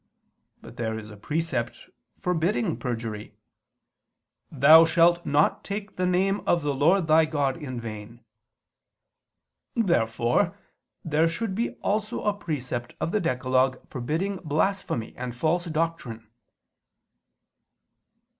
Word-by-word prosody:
But - - -12
there 110 -1 -2
is 110 0 -9
a - - -10
precept 130 +1 -3 0.3
forbidding 180 +2 0
perjury, 115 -4 -5 1.2
"Thou 155 +3 +8
shalt 170 +1 +3
not 145 +1 +2
take 200 0 -6
the 180 0 0
name 190 +3 +1
of 170 -2 +2
the 145 -1 0
Lord 165 +7 +3
thy 160 +1 +5
God 145 -4 0
in 130 -6 -6
vain." 115 +1 -8 1.5
Therefore 120 - +1 0.5
there 160 +1 +2
should 190 +5 -3
be 230 +5 -2
also 215 +3 -1
a 210 - +2
precept 125 -10 -5
of 165 - -2
the 215 - +1
decalogue 130 -3 +1
forbidding 160 +10 -2
blasphemy 160 - -1
and 125 -1 -5
false 165 +7 0
doctrine. 155 -9 -3
155 Hz, 115 wpm, -26 LUFS, 125-180 Hz, 1.5 s, Thou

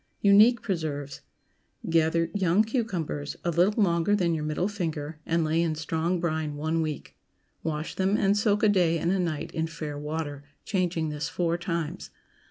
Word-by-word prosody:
UNIQUE 210 +4 +6
PRESERVES. 150 -7 -3 0.7
✠ - - -3
Gather 165 0 +2
young 195 0 +3
cucumbers, 190 - -2
a 170 - +2
little 190 +6 +3
longer 170 +2 +2
than 175 -4 +1
your 155 -2 -2
middle 155 +4 -1
finger, 160 -6 -4
and 165 0 +2
lay 160 +1 +1
in 165 -2 0
strong 160 +3 -1
brine 155 -3 -2
one 160 +2 -1
week. 155 -2 -4 0.5
Wash 155 0 -3
them 195 +2 +1
and 200 0 +3
soak 205 0 +2
a 215 - +6
day 175 -4 +3
and 170 +2 0
a 195 - +1
night 165 -4 -2
in 160 0 -1
fair 155 -3 -6
water, 150 -1 -4 0.2
changing 175 -5 0
this 150 0 -3
four 170 +1 0
times. 170 -3 -3
165 Hz, 175 wpm, -27 LUFS, 155-190 Hz, 0.7 s, UNIQUE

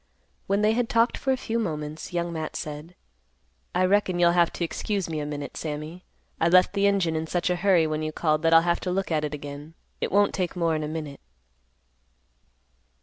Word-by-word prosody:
When 200 +2 +1
they 215 - +4
had 240 0 0
talked 230 +1 +3
for 270 - -1
a 260 - +1
few 230 -1 -2
moments, 155 -6 -4
Young 170 -1 -2
Matt 160 -1 -4
said, 155 +3 -6 0.8
"I 185 +1 +3
reckon 190 -1 +2
you'll 175 -1 +5
have 170 -1 +3
to - - -3
excuse 195 +2 -2
me 160 -2 -3
a 145 - -3
minute, 145 -1 -6
Sammy; 155 +3 -6 0.3
I 165 - +3
left 185 +2 +5
the 200 0 +3
engine 190 -5 +1
in 160 0 -2
such 175 +2 0
a - - +2
hurry 180 -3 +4
when 155 0 -2
you 155 0 -2
called 155 -1 0
that 165 0 +2
I'll 165 0 +7
have 170 0 +1
to 185 - -4
look 190 0 -2
at 155 -1 +1
it 150 0 -2
again. 145 +2 -9 0.3
It - - -1
won't 205 +1 +3
take 185 -2 -2
more'n 165 -3 0
a 150 - -3
minute." 155 -3 -6
170 Hz, 210 wpm, -26 LUFS, 155-185 Hz, 0.8 s, I'll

